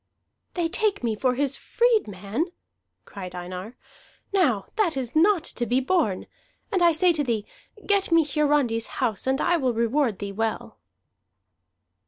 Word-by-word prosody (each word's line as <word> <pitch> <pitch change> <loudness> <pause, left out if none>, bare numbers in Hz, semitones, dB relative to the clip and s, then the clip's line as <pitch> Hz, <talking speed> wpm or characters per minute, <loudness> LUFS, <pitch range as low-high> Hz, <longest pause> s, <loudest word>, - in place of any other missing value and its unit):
"They 345 -2 +1
take 400 - 0
me 225 -2 0
for 250 +2 +1
his 280 0 0
freedman!" 320 - 0 0.5
cried 180 -2 -8
Einar. 180 +6 -7 0.6
"Now 255 - +2
that 380 -10 +1
is 250 -1 -4
not 345 +1 +4
to 240 -6 -3
be 250 +2 +2
borne! 265 - 0 0.5
And 375 - +1
I 345 -1 +6
say 345 +2 +3
to 300 -3 0
thee, 225 -5 -1 0.4
get 400 -3 +1
me 330 -2 +5
Hiarandi's 285 -6 +1
house 235 -3 -1
and 265 +1 +1
I 350 +2 +2
will 260 -5 0
reward 235 0 +1
thee 200 0 -5
well." 220 +1 -3
265 Hz, 150 wpm, -25 LUFS, 225-335 Hz, 0.6 s, I